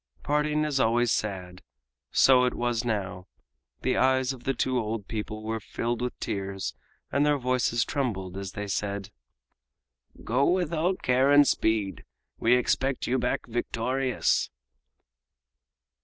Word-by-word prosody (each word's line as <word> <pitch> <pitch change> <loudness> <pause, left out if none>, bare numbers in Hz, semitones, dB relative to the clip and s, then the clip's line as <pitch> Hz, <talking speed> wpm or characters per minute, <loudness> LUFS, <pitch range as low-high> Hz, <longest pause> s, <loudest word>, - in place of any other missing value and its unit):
Parting 150 +1 +1
is 145 -3 0
always 120 0 +3
sad. 90 -4 -3 0.5
So 130 -1 +5
it 125 - -1
was 120 -1 -1
now. 100 -6 -3 0.6
The 130 - +1
eyes 130 0 +2
of 125 -2 -13
the 135 - +1
two 130 +1 0
old 110 -2 -3
people 110 0 -5
were 110 +1 -2
filled 120 +3 -3
with 125 0 -3
tears 100 -2 -3 0.4
and 140 - +2
their 150 0 +3
voices 125 -2 +1
trembled 100 -10 -2
as 95 -1 -6
they 105 - -4
said: 100 +1 -3 1.1
"Go 125 +5 +2
with 175 -2 +1
all 170 +4 +1
care 130 -3 +2
and 145 0 +7
speed. 105 -7 0 0.4
We 115 +2 +4
expect 130 +1 0
you 130 +2 +1
back 125 +1 -1
victorious!" 125 +2 0
120 Hz, 140 wpm, -27 LUFS, 105-130 Hz, 1.1 s, and